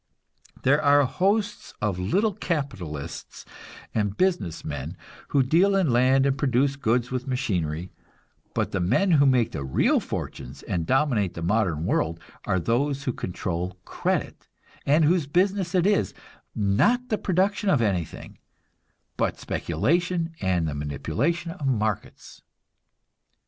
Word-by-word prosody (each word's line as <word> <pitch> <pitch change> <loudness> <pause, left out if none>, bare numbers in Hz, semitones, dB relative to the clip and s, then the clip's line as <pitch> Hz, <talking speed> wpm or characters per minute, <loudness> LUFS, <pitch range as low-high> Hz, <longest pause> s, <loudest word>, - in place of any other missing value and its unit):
There 145 +4 +4
are 145 -1 +5
hosts 195 - -1
of 105 -4 -1
little 195 - +1
capitalists 100 - -5 0.5
and 105 -2 -1
business 180 - 0
men 75 -2 -5 0.3
who 140 - +3
deal 175 +9 +3
in 185 -8 +2
land 130 +3 +4
and 135 -1 +2
produce 135 0 +1
goods 125 -2 0
with 130 +1 -3
machinery, 90 - -2 0.6
but - - 0
the 95 - -1
men 140 - +2
who 140 -3 +5
make 125 -4 +3
the 70 - -4
real 65 -1 +2
fortunes - - -6
and 85 -2 -2
dominate 125 - +1
the 85 - -5
modern 85 -5 +1
world 85 -2 0 0.3
are 95 - +1
those 135 - 0
who 130 - -1
control 90 -1 -4
credit, - - -2 0.4
and 150 +3 +5
whose 165 -2 +2
business 185 +3 +1
is, 180 - +2 0.4
not 175 - +2
the 215 - +1
production 195 +3 +1
of 150 - +4
anything, 90 -7 -3 0.8
but - - -1
speculation 170 - 0
and 90 -4 +1
the 75 - -2
manipulation 120 - -2
of 155 -5 -5
markets. 110 -5 -2
130 Hz, 135 wpm, -25 LUFS, -, 0.8 s, are